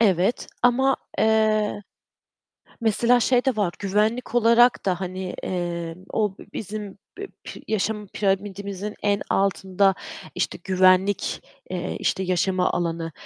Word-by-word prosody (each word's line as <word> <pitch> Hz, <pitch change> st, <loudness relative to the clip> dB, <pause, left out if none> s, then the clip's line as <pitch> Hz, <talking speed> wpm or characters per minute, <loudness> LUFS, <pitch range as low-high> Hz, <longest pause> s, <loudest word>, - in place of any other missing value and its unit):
Evet 195 Hz, 0 st, +2 dB, 0.2 s
ama 265 Hz, +2 st, +4 dB, 0.2 s
eee, 215 Hz, -1 st, +2 dB, 1.0 s
mesela, 235 Hz, +2 st, +3 dB
şey 245 Hz, +1 st, +3 dB
de 265 Hz, -4 st, +1 dB
var, 200 Hz, -5 st, +1 dB
güvenlik 210 Hz, +5 st, 0 dB
olarak 240 Hz, 0 st, +4 dB
da, 180 Hz, -2 st, 0 dB
hani, 185 Hz, 0 st, -4 dB
eee, 170 Hz, -2 st, -3 dB, 0.2 s
o 210 Hz, -3 st, 0 dB, 0.2 s
bizim 210 Hz, -1 st, -6 dB, 0.2 s
bi 405 Hz, -, -5 dB, 0.2 s
pi -, -, -9 dB
yaşam 210 Hz, 0 st, -1 dB
piramitimizin 200 Hz, +1 st, -2 dB
en 205 Hz, -1 st, +2 dB
altında, 195 Hz, 0 st, +2 dB, 0.4 s
işte, -, -, -2 dB
güvenlik, 185 Hz, +1 st, +3 dB, 0.3 s
eee, 180 Hz, -1 st, -3 dB
işte, 190 Hz, -, 0 dB
yaşama 185 Hz, 0 st, +1 dB
alanı 165 Hz, -1 st, -2 dB
200 Hz, 120 wpm, -24 LUFS, 185-220 Hz, 1.0 s, ama